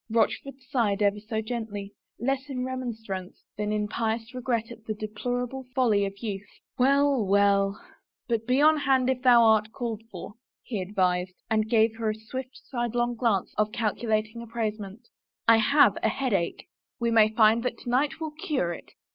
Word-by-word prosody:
Rochford 230 +4 0
sighed 210 -6 +1
ever 205 0 +2
so 220 +1 -3
gently, 215 -3 -5 0.2
less 270 +4 -2
in 255 -2 -3
remonstrance 225 -8 -5
than 210 0 -2
in 210 0 0
pious 225 +2 -2
regret 240 -2 -2
at 230 -2 -11
the 215 - -3
deplorable 245 +5 -4
folly 215 -6 +3
of 195 0 -9
youth. 205 -2 -4 0.2
" - - -62
Well, 275 -1 +4
well 200 0 +3 0.3
— - - -66
but 230 -2 -1
be 255 +2 +3
on 310 +1 +6
hand 265 -3 +2
if 255 -1 -3
thou 245 -2 +6
art 220 -1 +4
called 230 -3 -4
for," 190 +1 -8 0.3
he 215 -6 -3
advised, 185 -1 0 0.2
and 215 0 +1
gave 225 -1 +3
her 225 -1 -1
a 215 - -1
swift, 255 +4 -8
sidelong 240 -1 -1
glance 225 -5 0
of 215 0 +2
calculating 220 0 -1
appraisement. 220 -1 -5 0.2
" - - -57
I 230 0 +7
have 220 -2 +5
a 220 - +2
headache." 210 -10 -1 0.2
" - - -67
We 235 -1 0
may 220 -1 +6
find 220 +1 +4
that 240 -1 -2
to - - -6
night 275 +5 +1
will 315 -1 -4
cure 295 - -2
it." - - -12
225 Hz, 180 wpm, -27 LUFS, 210-250 Hz, 0.3 s, I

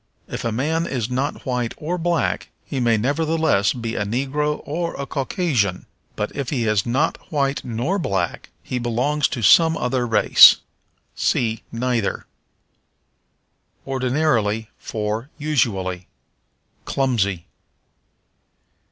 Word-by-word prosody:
If - - -5
a 115 - -1
man 160 +8 0
is 125 -2 -3
not 135 +4 -2
white 125 -3 -2
or 175 +4 -3
black 170 0 0 0.2
he 135 - -4
may 120 -2 +3
nevertheless 150 -3 +1
be 115 -2 -4
a 105 - -1
Negro 140 +7 -1
or 170 +3 -3
a 140 - -2
Caucasian; 135 - -1 0.3
but 105 - -3
if 140 -3 -3
he 125 -6 -1
is 110 -2 +1
not 135 +7 +1
white 140 -2 0
nor 125 - -1
black 95 - -2
he 125 - -3
belongs 125 +5 +1
to 120 - -5
some 160 - +6
other 125 -1 -1
race. 110 -2 +8 0.6
See 115 -2 0
Neither. 120 -3 -1 1.6
Ordinarily 125 -5 0
for 110 +4 -3
Usually. 100 - -1 0.8
Clumsy. 100 -10 0
125 Hz, 115 wpm, -22 LUFS, 110-150 Hz, 1.6 s, race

